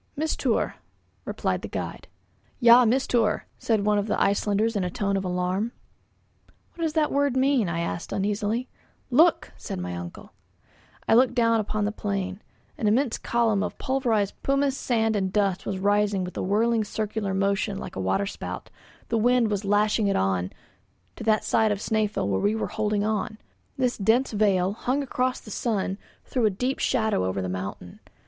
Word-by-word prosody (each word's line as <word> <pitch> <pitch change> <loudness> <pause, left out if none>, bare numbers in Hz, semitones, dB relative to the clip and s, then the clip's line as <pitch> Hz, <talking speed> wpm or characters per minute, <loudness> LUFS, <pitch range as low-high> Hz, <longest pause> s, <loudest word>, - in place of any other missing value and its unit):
"Mistour," 315 +2 0 0.5
replied - - -2
the - - -5
guide. - - -5 0.5
"Ja 240 0 +7
Mistour," 230 -3 +1
said 220 -3 +1
one 210 -1 +3
of 205 - -2
the - - 0
Icelanders 205 +3 +1
in 200 - 0
a 180 - -1
tone 200 +2 -1
of 195 - -1
alarm. 185 +5 -1 1.0
"What 335 - -5
does 315 - -1
that 310 -2 +1
word 280 -2 +1
mean?" 260 -7 +2
I 170 0 -1
asked 170 0 -4
uneasily. 210 +5 -1 0.4
"Look!" 320 +3 +4
said - - -6
my 90 0 -4
uncle. 85 0 -8 0.7
I - - +4
looked 250 +1 +4
down 230 -2 +3
upon 215 0 -1
the 210 - 0
plain. 195 -2 -3 0.4
An 215 - +1
immense 235 +3 +2
column 230 -4 +1
of 210 - -3
pulverized 235 -7 0
pumice, 275 0 +1
sand 225 -4 0
and 190 -2 0
dust 195 -2 0
was 195 - -2
rising 205 0 +2
with 180 - -6
a - - -2
whirling 220 +4 +2
circular 210 -1 -3
motion 195 0 0
like - - -7
a 95 - -3
waterspout; 195 - -3 0.4
the 230 - +1
wind 240 -1 +3
was 205 0 -2
lashing 210 +1 +2
it 200 - +1
on 95 -1 0 0.6
to - - -8
that 215 -1 +3
side 220 -1 +2
of 205 - 0
Snæfell 210 - -1
where 95 -1 0
we 205 +2 +2
were 220 - -1
holding 215 -1 0
on; 215 0 -1 0.4
this 250 -3 0
dense 225 +6 +2
veil, 200 -3 +2
hung 260 +6 -1
across 255 -1 -1
the 215 - -12
sun, 200 -3 -1 0.3
threw 245 -4 +1
a - - +3
deep 250 +7 -2
shadow 220 - +1
over 95 +1 -1
the 95 - -2
mountain. 95 -1 -6
210 Hz, 175 wpm, -25 LUFS, 195-235 Hz, 1.0 s, Ja